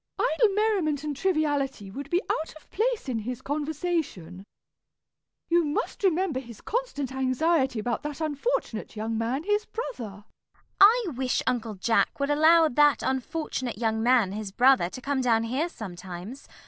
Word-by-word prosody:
Idle 395 +4 +2
merriment 380 -10 +1
and 300 -1 -3
triviality 285 - 0
would 280 +6 -7
be 350 +4 +1
out 315 - -2
of 310 - -17
place 465 - 0
in 245 -4 -1
his 245 +3 -5
conversation. 295 - -3 1.0
You 345 0 +3
must 295 +6 -3
remember 360 -6 +2
his 235 -4 -11
constant 450 - -3
anxiety 265 +1 +1
about 235 +3 -2
that 295 0 -5
unfortunate 310 - -2
young 220 +1 -3
man 235 +6 -1
his 415 +2 +1
brother. 225 - -6 0.3
CECILY. - - -36
I 450 +4 +7
wish 255 0 0
Uncle 230 -3 -1
Jack 225 +8 +1
would 280 +1 0
allow 320 +2 +6
that 295 +1 +3
unfortunate 260 -2 -2
young 220 -1 0
man, 235 -5 +3
his 205 -1 -5
brother, 250 -4 +4
to 255 - -9
come 280 -1 0
down 230 -3 +2
here 265 +9 -1
sometimes. 190 - -8
275 Hz, 155 wpm, -27 LUFS, 230-325 Hz, 1.0 s, I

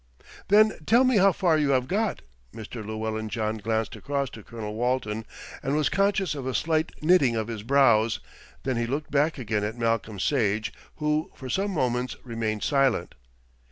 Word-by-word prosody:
"Then 215 +2 +5
tell 240 +3 +6
me 255 -3 +3
how 195 0 +6
far 170 -3 +2
you 145 -2 +1
have 125 0 -3
got." 210 +6 -1 0.3
Mr. 110 +1 -7
Llewellyn 110 0 -3
John 110 -1 -2
glanced 110 +1 -1
across 140 -1 -2
to 110 - -10
Colonel 105 -1 -7
Walton, 115 -2 -1 0.4
and 140 0 -1
was 150 -2 +2
conscious 195 -3 +1
of 135 -3 -5
a 130 - -2
slight 160 0 +1
knitting 155 -8 +4
of 110 0 -2
his 110 -3 -4
brows, 115 -3 +3 0.4
then 130 -3 -1
he 120 0 0
looked 145 +5 -3
back 150 +3 +2
again 105 -4 -1
at 110 +3 -3
Malcolm 115 -2 -1
Sage, 105 -4 0 0.2
who 150 +1 0
for 130 -2 -7
some 200 +2 0
moments 125 -7 -1
remained 115 -3 -3
silent. 135 - +1
125 Hz, 175 wpm, -26 LUFS, 110-155 Hz, 0.4 s, tell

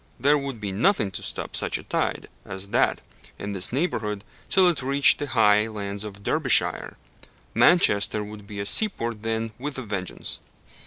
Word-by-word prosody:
There 140 +5 +3
would 140 -5 -4
be 100 -2 -5
nothing 105 - +1
to 90 - -6
stop - - -4
such - - 0
a - - -11
tide - - -3 0.2
as 95 +1 -7
that - - +1 0.3
in 100 - -6
this 95 -2 +1
neighbourhood 110 - -2 0.3
till 190 -2 +5
it 170 -6 0
reached 140 +2 +5
the 145 - -3
high 105 -3 +3
lands 100 -2 -6
of 100 -1 -10
Derbyshire. - - +2 0.6
Manchester 105 - +3
would 105 -1 -11
be 105 -1 -8
a 100 - -3
seaport 115 - +1
then 115 0 -3
with 145 +2 -5
a 130 - -5
vengeance! 100 -5 -5
110 Hz, 170 wpm, -24 LUFS, 100-140 Hz, 0.6 s, till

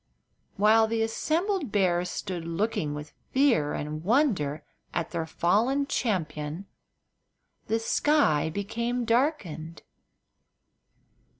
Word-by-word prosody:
While 220 +2 +5
the 225 0 0
assembled 320 - -1
bears 180 -3 +2
stood 180 -3 -4
looking 165 -3 -1
with 150 0 -8 0.2
fear 260 - +3
and 155 +1 -4
wonder 185 - +1 0.3
at 170 - -2
their 165 -2 -2
fallen 230 - +2
champion 170 - -2 1.0
the 225 - +1
sky 225 - +2
became 235 +7 -2
darkened. 210 - -1
205 Hz, 95 wpm, -27 LUFS, 160-240 Hz, 1.0 s, While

